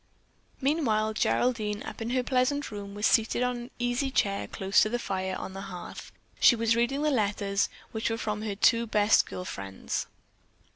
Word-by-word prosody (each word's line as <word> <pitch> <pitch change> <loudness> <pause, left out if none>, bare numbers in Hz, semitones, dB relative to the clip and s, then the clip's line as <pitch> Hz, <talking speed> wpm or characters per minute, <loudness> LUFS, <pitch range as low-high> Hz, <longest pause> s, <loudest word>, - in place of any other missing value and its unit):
Meanwhile 235 -7 +1
Geraldine, 215 -2 0
up - - -8
in 225 - -2
her 255 0 +1
pleasant 260 +2 0
room, 200 -1 -7
was 210 +1 -1
seated 225 +2 +3
in - - +3
an 240 0 -6
easy 245 +3 0
chair 200 -6 0
close 195 +1 +2
to 215 - +3
the 240 - 0
fire 190 -4 -3
on 190 - -6
the 195 - -6
hearth. 180 -2 -8 0.3
She 240 - +7
was 230 0 +2
reading 270 +5 +1
the 305 - +2
letters, 200 -4 +1 0.2
which 220 0 -1
were 225 - -1
from 215 -2 -3
her 215 -2 -3
two 230 +3 +3
best 210 0 +4
girl 180 - -6
friends. 95 - -4
220 Hz, 185 wpm, -28 LUFS, 205-245 Hz, 0.3 s, She